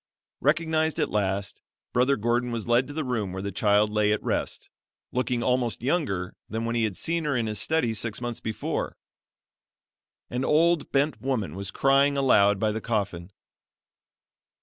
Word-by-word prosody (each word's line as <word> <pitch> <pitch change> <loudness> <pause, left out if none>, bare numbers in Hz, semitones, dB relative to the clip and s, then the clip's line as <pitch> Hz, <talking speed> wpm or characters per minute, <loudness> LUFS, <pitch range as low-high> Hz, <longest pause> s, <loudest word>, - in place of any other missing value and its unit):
Recognized 160 +2 +1
at - - 0
last, 100 -1 -1 0.3
Brother 130 +3 +3
Gordon 120 +3 0
was 115 -3 -3
led 120 +2 +3
to 145 - -8
the 155 +1 -2
room 115 -7 -2
where 95 +1 -5
the 100 - -3
child 105 +2 +2
lay 105 0 +2
at 105 - 0
rest, - - -2 0.4
looking 125 -1 -1
almost 125 -2 0
younger 120 - -1
than 110 +1 -3
when 115 - -1
he 115 -1 +2
had 100 -5 -3
seen 170 0 -1
her 145 -2 0
in 115 - 0
his 105 -2 +1
study 155 -8 +1
six 110 0 -1
months 120 -1 -4
before. 110 - -3 1.3
An 125 +2 -1
old 165 +3 +2
bent 140 -4 +1
woman 115 - -1
was 100 +1 -5
crying 140 +6 +3
aloud 105 -7 +4
by 110 0 +1
the 110 +1 -4
coffin. 100 -6 -2
115 Hz, 170 wpm, -26 LUFS, 105-135 Hz, 1.3 s, aloud